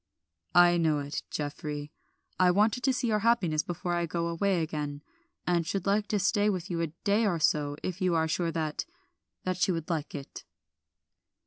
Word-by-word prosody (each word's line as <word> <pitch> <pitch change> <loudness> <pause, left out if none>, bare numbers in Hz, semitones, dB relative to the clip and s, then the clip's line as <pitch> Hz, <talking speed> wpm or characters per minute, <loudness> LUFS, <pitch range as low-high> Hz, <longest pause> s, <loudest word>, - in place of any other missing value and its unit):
"I 175 0 +7
know 160 -3 +2
it, 145 0 -3
Geoffrey. 145 0 -4 0.5
I 185 -1 +6
wanted 210 +6 +3
to 270 - +4
see 250 - -1
your 215 -2 +2
happiness 200 -9 +2
before 175 +1 -3
I 170 0 0
go 170 +1 -2
away 175 +1 +1
again, 150 -2 -4 0.4
and 175 -1 +2
should 195 0 -2
like 205 +1 +2
to 210 - 0
stay 205 +1 +2
with 185 -2 -3
you 170 -1 -1
a 165 - +1
day 205 +7 +1
or 175 -4 +1
so 150 -2 +1
if 185 +1 -4
you 180 -2 +2
are 160 0 +2
sure 165 +1 0
that 155 -2 -2 0.6
that 185 -1 -1
she 190 +1 +2
would 165 0 -3
like 160 -2 -3
it." 135 - -8
175 Hz, 190 wpm, -29 LUFS, 155-195 Hz, 0.6 s, I